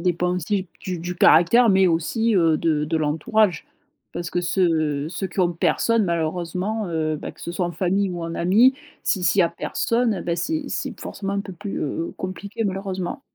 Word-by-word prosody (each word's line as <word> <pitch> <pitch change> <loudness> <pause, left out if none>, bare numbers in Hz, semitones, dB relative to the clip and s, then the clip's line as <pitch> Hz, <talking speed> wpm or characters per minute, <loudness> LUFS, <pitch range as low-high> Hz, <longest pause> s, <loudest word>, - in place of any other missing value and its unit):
dépend 180 0 0
aussi 185 +2 -1
du 180 -2 -4
du 175 +2 -5
caractère, 175 +9 +5
mais 190 -2 +5
aussi, 215 +7 +1
heu, 165 -4 +4
de 150 -2 0
de 160 +1 0
l'entourage. 160 +5 +1 0.5
Parce 175 -1 -5
que 175 - 0
ceux 160 -4 0
ceux 190 - -3
qui 185 +1 -3
ont 175 -1 +2
personne, 225 +6 +2
malheureusement, 175 +5 -2
heu, 155 -2 -1
bah, - - -7
que - - -20
ce 170 - -5
soit 175 0 -1
en 175 - -5
famille 190 +2 0
ou 175 -2 -5
en 165 0 -4
amis, 210 +11 +4 0.3
si 190 - 0
s'il 180 +3 +3
y - - +7
a 170 - +1
personne, 230 +6 0
et 185 - -5
bah 170 -1 -1
c'est 310 - -1
c'est - - -4
forcément 200 -1 -5
un 200 - 0
peu 195 - -8
plus, 200 +3 -5
heu, 165 +3 -3
compliqué, 200 +4 -5
malheureusement. 190 +2 -3
180 Hz, 200 wpm, -23 LUFS, 165-200 Hz, 0.5 s, y